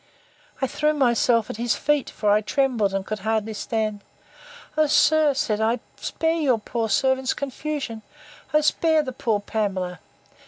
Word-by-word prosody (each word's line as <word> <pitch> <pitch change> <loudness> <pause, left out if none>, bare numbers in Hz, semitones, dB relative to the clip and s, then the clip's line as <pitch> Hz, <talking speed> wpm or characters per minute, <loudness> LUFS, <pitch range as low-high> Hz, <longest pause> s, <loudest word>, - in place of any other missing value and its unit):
I - - +5
threw 300 +3 0
myself 240 -4 +2
at - - -8
his 235 0 0
feet; 295 -1 0
for 210 -1 0
I 210 +1 +4
trembled, 230 -2 +1
and 195 0 -2
could 215 0 -4
hardly 220 +1 -1
stand: 215 -1 -2 0.7
O 310 0 +3
sir, 305 -1 +4
said 215 -4 0
I, 230 +2 +1 0.2
spare 325 +1 -1
your 265 -6 +2
poor 225 +1 -3
servant's 265 +2 +1
confusion! 280 -4 -4 0.5
O 305 - +4
spare 315 +1 +2
the 260 -3 -5
poor 220 -3 0
Pamela! 195 -4 -3
235 Hz, 155 wpm, -24 LUFS, 215-290 Hz, 0.7 s, I